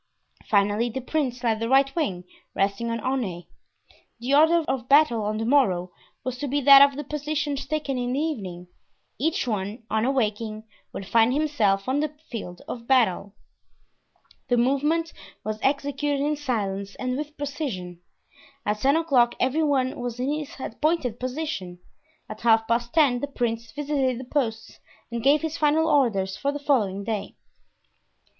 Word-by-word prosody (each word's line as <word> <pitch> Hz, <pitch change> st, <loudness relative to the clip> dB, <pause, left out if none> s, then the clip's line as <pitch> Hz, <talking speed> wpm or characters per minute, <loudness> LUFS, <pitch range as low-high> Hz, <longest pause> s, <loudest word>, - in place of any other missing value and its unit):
Finally, 205 Hz, +3 st, +2 dB
the 265 Hz, -, -4 dB
prince 255 Hz, -2 st, -2 dB
led 225 Hz, -2 st, +1 dB
the 230 Hz, +1 st, -2 dB
right 270 Hz, +1 st, +3 dB
wing, 195 Hz, -, -1 dB, 0.3 s
resting 200 Hz, +4 st, 0 dB
on 230 Hz, 0 st, -2 dB
Aunay. 215 Hz, -10 st, -2 dB, 0.7 s
The 250 Hz, +4 st, -2 dB
order 320 Hz, +3 st, +5 dB
of 255 Hz, -2 st, -2 dB
battle 275 Hz, -6 st, +5 dB
on 210 Hz, +1 st, -1 dB
the 225 Hz, -, -2 dB
morrow 195 Hz, -10 st, +2 dB, 0.3 s
was 255 Hz, -1 st, -4 dB
to 290 Hz, -, -3 dB
be 285 Hz, +2 st, 0 dB
that 275 Hz, 0 st, +9 dB
of 280 Hz, -1 st, +6 dB
the 295 Hz, -, -3 dB
positions 295 Hz, -1 st, -3 dB
taken 290 Hz, -4 st, -2 dB
in 245 Hz, 0 st, -2 dB
the 270 Hz, -, 0 dB
evening. 195 Hz, -, -4 dB, 0.5 s
Each 320 Hz, +2 st, 0 dB
one, 210 Hz, +1 st, -3 dB
on 220 Hz, 0 st, +1 dB
awaking, 220 Hz, -4 st, -1 dB, 0.3 s
would 195 Hz, -, -6 dB
find 225 Hz, +4 st, +3 dB
himself 230 Hz, -10 st, +1 dB
on 265 Hz, +2 st, +1 dB
the 300 Hz, 0 st, -2 dB, 0.2 s
field 180 Hz, -7 st, -7 dB
of 235 Hz, -1 st, -7 dB
battle. 210 Hz, -6 st, +2 dB, 1.1 s
The 245 Hz, -, +2 dB
movement 295 Hz, +7 st, +1 dB, 0.3 s
was 215 Hz, 0 st, -4 dB
executed 285 Hz, +1 st, 0 dB
in 295 Hz, +2 st, 0 dB
silence 200 Hz, -8 st, -3 dB
and 255 Hz, -1 st, -2 dB
with 300 Hz, +2 st, -6 dB
precision. 245 Hz, -, -5 dB, 0.6 s
At 210 Hz, 0 st, 0 dB
ten 275 Hz, +5 st, +3 dB
o'clock 265 Hz, -8 st, +3 dB
every 265 Hz, +5 st, +1 dB
one 270 Hz, -4 st, +1 dB
was 245 Hz, -1 st, -4 dB
in 260 Hz, +3 st, 0 dB
his 300 Hz, -2 st, -5 dB
appointed 260 Hz, -2 st, -1 dB
position; 255 Hz, -, -4 dB, 0.5 s
at 215 Hz, -, -9 dB
half 225 Hz, -1 st, +4 dB
past 235 Hz, +1 st, 0 dB
ten 280 Hz, -5 st, +3 dB
the 285 Hz, -, -3 dB
prince 230 Hz, -4 st, -3 dB
visited 280 Hz, -4 st, -1 dB
the 260 Hz, -, -7 dB
posts 245 Hz, -5 st, -3 dB, 0.3 s
and 235 Hz, 0 st, -3 dB
gave 290 Hz, +5 st, +4 dB
his 320 Hz, 0 st, -3 dB
final 310 Hz, +1 st, +3 dB
orders 215 Hz, -11 st, +2 dB
for 280 Hz, -, -1 dB
the 290 Hz, -, -4 dB
following 215 Hz, -10 st, 0 dB
day. 215 Hz, -1 st, -4 dB
255 Hz, 165 wpm, -25 LUFS, 220-290 Hz, 1.1 s, that